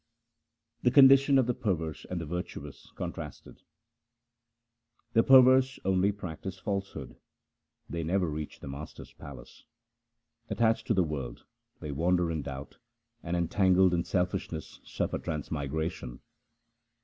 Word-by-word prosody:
The 125 - +4
condition 135 +1 +7
of 130 - +4
the 125 - 0
perverse 80 -9 -3
and 90 - -3
the 85 - -5
virtuous 90 +3 -7
contrasted: - - -7 0.8
— 115 0 -48
The 115 - +6
perverse 130 0 +6
only 95 +1 +3
practise 95 -1 -7
falsehood; 100 0 -5 0.7
They 85 - -4
never 90 +2 +1
reach 75 -1 -6
the - - -8
Master's 70 +3 -9
palace. 70 -2 -12 0.9
Attached 115 -1 +1
to - - +2
the 95 - +4
world 70 -7 -5 0.4
they 75 - -5
wander 85 +3 +1
in 80 -2 -2
doubt, 70 0 -8 0.4
And 85 +1 -2
entangled 95 +1 +3
in 85 -1 +1
selfishness 90 -4 -3
suffer - - -3
transmigration. 75 -3 -4
90 Hz, 125 wpm, -29 LUFS, 80-115 Hz, 0.9 s, condition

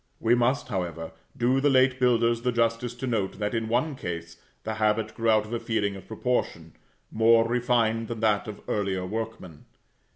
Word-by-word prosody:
We 115 +1 +3
must, 125 +3 +1
however, 85 -5 -4 0.3
do 130 +2 +2
the 145 - +4
late 130 -1 +3
builders 120 -2 +2
the 125 +1 0
justice 115 +1 0
to 130 +2 -5
note 110 -7 -1
that, 105 0 -2
in 115 -1 -1
one 130 +6 0
case, 85 -6 -6 0.3
the 110 - -3
habit 110 0 0
grew 115 0 0
out 110 -1 +4
of 110 - -8
a 120 - -1
feeling 105 -4 -1
of 95 -1 -11
proportion, 110 -8 -2 0.4
more 115 +1 +4
refined 115 -2 +1
than 115 -1 -5
that 110 -2 +2
of 105 - -8
earlier 95 -3 -1
workmen. 110 -6 -6
115 Hz, 185 wpm, -26 LUFS, 105-120 Hz, 0.4 s, the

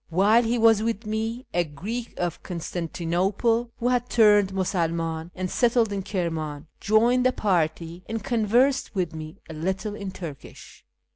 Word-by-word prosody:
Wliih; 215 +7 +4
lie - - +1
was 225 -2 +5
with 225 0 -2
me, 225 +3 -3
a 175 - +2
Greek 205 +11 -6
of 175 -1 -2
Constantinople, 180 +7 -1
whu 245 - +1
had 245 0 0
turned 205 -4 +5
Musulnuin 165 -3 -1
and 185 0 -2
settled 235 -3 +2
in 200 - -2
Kirman, 160 -6 -3
joined 235 +4 +3
the 255 - +4
party, 170 -4 -1
and 225 -2 -3
conversed 240 +4 +2
with 180 -4 -1
me 155 0 -8
a 160 - -8
little 190 +6 -3
in 200 -2 -5
Turkish. 170 -7 -10
195 Hz, 150 wpm, -25 LUFS, 170-225 Hz, -, was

